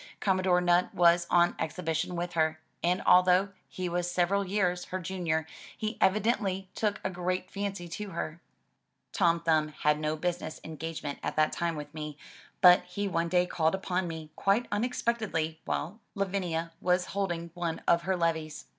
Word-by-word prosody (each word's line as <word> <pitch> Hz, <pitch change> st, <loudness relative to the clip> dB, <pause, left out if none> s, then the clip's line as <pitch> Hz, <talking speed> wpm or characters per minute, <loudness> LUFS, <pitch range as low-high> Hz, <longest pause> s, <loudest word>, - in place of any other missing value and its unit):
Commodore 185 Hz, -2 st, +2 dB
Nutt 175 Hz, 0 st, +2 dB
was 170 Hz, 0 st, +5 dB
on 175 Hz, 0 st, +4 dB
exhibition 160 Hz, +1 st, -2 dB
with 175 Hz, +1 st, -3 dB
her, 160 Hz, -1 st, +1 dB, 0.2 s
and 180 Hz, +2 st, +1 dB
although 180 Hz, +2 st, +5 dB, 0.2 s
he 185 Hz, -1 st, -4 dB
was 175 Hz, 0 st, -1 dB
several 180 Hz, +3 st, +2 dB
years 180 Hz, -2 st, 0 dB
her 185 Hz, -, -4 dB
junior 170 Hz, -3 st, -1 dB, 0.3 s
he 215 Hz, +1 st, -3 dB
evidently 195 Hz, -2 st, +1 dB
took 210 Hz, -1 st, -1 dB
a -, -, 0 dB
great 185 Hz, +1 st, -2 dB
fancy 200 Hz, -3 st, -4 dB
to 205 Hz, +4 st, -6 dB
her. 165 Hz, -1 st, -5 dB, 0.7 s
Tom 170 Hz, -3 st, +2 dB
Thumb 160 Hz, -2 st, +2 dB
had 150 Hz, 0 st, 0 dB
no 155 Hz, 0 st, -1 dB
business 175 Hz, -1 st, -3 dB
engagement 160 Hz, -2 st, -5 dB
at -, -, -3 dB
that 155 Hz, 0 st, +3 dB
time 170 Hz, -1 st, -1 dB
with 150 Hz, -1 st, -7 dB
me, 150 Hz, -2 st, -6 dB, 0.4 s
but 180 Hz, -1 st, +8 dB
he 200 Hz, +3 st, -3 dB
one 170 Hz, -2 st, 0 dB
day 180 Hz, 0 st, +3 dB
called 160 Hz, -1 st, +1 dB
upon 185 Hz, -1 st, -1 dB
me 160 Hz, -2 st, -7 dB
quite 200 Hz, +5 st, +2 dB
unexpectedly 205 Hz, -8 st, -1 dB
while 185 Hz, +9 st, -3 dB, 0.2 s
Lavinia 180 Hz, -4 st, -1 dB
was 180 Hz, 0 st, +2 dB
holding 175 Hz, -4 st, -2 dB
one 170 Hz, -2 st, -3 dB
of 170 Hz, 0 st, +4 dB
her 185 Hz, +1 st, 0 dB
levees. 160 Hz, -2 st, -1 dB
175 Hz, 165 wpm, -29 LUFS, 165-190 Hz, 0.7 s, but